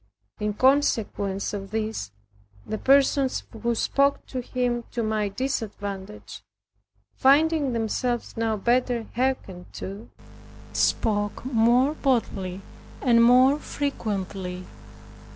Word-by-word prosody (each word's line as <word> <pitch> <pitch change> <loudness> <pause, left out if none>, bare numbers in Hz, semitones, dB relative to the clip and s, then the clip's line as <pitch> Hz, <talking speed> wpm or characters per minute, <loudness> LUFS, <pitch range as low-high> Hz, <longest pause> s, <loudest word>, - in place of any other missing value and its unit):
In 210 0 -2
consequence 220 -8 +1
of 195 -1 -5
this, 220 - -3 0.6
the 215 - -4
persons 275 0 +3 0.2
who 235 0 0
spoke 280 +4 +1
to 255 - -4
him 245 -1 -1
to 235 - -1
my 215 -1 0
disadvantage, 200 - -5 0.7
finding 290 0 +3
themselves 235 +2 -2
now 225 -1 0
better 240 +1 +1
hearkened 235 -8 -2
to, 200 +4 -7 0.6
spoke 205 0 0
more 250 +3 +3
boldly 195 -10 -1 0.4
and 235 -3 +5
more 255 +4 +6
frequently. 195 -11 -4
230 Hz, 100 wpm, -25 LUFS, 205-260 Hz, 0.7 s, more